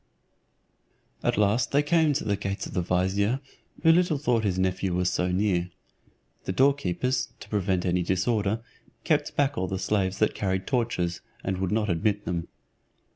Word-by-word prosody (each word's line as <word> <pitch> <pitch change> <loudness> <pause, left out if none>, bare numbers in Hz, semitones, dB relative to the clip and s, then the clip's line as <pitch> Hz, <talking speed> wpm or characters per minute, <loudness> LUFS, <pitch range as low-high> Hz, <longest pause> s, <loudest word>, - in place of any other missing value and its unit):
At - - 0
last 105 +3 +2
they 145 +1 +3
came 160 -1 +3
to 140 - -1
the 100 - 0
gates 100 0 -3
of - - -8
the 90 - +1
vizier 95 +7 +1 0.4
who 165 - +7
little 175 -2 +3
thought 125 -5 +1
his 95 -3 0
nephew 95 0 0
was 90 0 +1
so 90 0 0
near. 90 -2 +1 0.8
The - - -1
doorkeepers, 130 0 +1
to - - -12
prevent 95 -3 0
any 90 0 +1
disorder, 100 +4 0 0.4
kept - - +1
back 145 0 +1
all 95 - -1
the 95 - -2
slaves 95 -1 0
that 110 - +2
carried 95 -1 -1
torches, 115 -9 -1 0.2
and 95 -1 -2
would 95 0 -1
not 105 0 +1
admit 100 +4 0
them. 85 -1 -2
100 Hz, 170 wpm, -27 LUFS, 90-120 Hz, 0.8 s, who